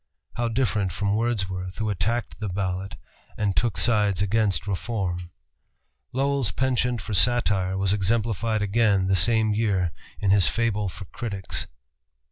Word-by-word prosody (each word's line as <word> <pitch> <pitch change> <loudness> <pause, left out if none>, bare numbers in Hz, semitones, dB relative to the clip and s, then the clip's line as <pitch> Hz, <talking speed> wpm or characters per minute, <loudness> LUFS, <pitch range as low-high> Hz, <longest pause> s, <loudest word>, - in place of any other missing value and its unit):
How 120 0 0
different 110 -5 0
from 100 +3 -1
Wordsworth 95 -5 -2
who 110 -1 -1
attacked 105 +4 -2
the 105 -2 -3
ballot 95 0 -3 0.4
and 100 -2 0
took 115 -7 +1
sides 105 -2 +2
against 100 -2 +1
reform! 95 -4 -3 0.8
Lowell's 135 -2 0
penchant 125 -1 0
for 110 - -5
satire 95 -3 +2
was 95 0 +2
exemplified 110 +1 0
again 100 -2 +2
the 95 0 +2
same 110 +4 +3
year 100 -6 +1 0.3
in 100 - +2
his 100 -3 +5
"Fable 105 -3 0
for 95 +2 -9
Critics." 100 -3 -4
105 Hz, 135 wpm, -25 LUFS, 95-115 Hz, 0.8 s, his